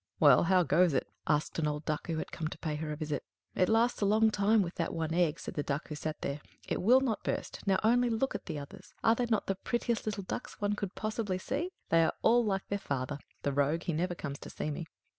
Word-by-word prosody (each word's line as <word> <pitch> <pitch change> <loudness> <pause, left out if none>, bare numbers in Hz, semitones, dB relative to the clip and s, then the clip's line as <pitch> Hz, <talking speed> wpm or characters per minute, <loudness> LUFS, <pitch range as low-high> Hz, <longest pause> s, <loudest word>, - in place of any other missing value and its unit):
"Well, - - +7
how 185 +1 +4
goes 165 +1 +3
it?" - - 0 0.2
asked 150 +2 +1
an 155 - +1
old 150 0 -3
Duck 155 -1 -2
who 165 -2 -1
had - - -4
come 160 - -3
to - - -7
pay 155 -2 -3
her 155 0 -4
a - - -2
visit. 150 -1 -3 0.3
"It 185 - +2
lasts 230 +2 +3
a - - +3
long 220 +2 +4
time 210 +1 +3
with 175 0 -5
that 165 - -2
one 160 -1 -1
egg," 165 -3 +2
said - - -6
the 150 - -1
Duck 145 +2 -3
who - - -4
sat 155 0 -4
there. 140 +2 -3 0.3
"It - - -1
will 250 +7 +6
not 235 -5 -1
burst. - - -3
Now, 190 -1 +4
only 245 +2 +4
look 235 +4 0
at 205 - -6
the 160 -4 -3
others; 140 -1 -10
are 225 - +6
they 240 +1 0
not 220 -3 +1
the 195 - 0
prettiest 235 +3 -2
little 210 -2 -2
ducks 185 - -6
one 205 0 +1
could 200 -2 -4
possibly 215 -3 -2
see? 280 - -2 0.2
They 165 0 +5
are - - +1
all 240 +2 +5
like 195 -3 -1
their 200 - -1
father. 140 -2 -3 0.2
The 140 - 0
rogue, 145 +4 +1
he 170 - -1
never 175 +3 -1
comes 140 -4 -5
to - - -9
see 155 - -3
me." 160 +3 -5
180 Hz, 260 wpm, -31 LUFS, 155-215 Hz, 0.3 s, Well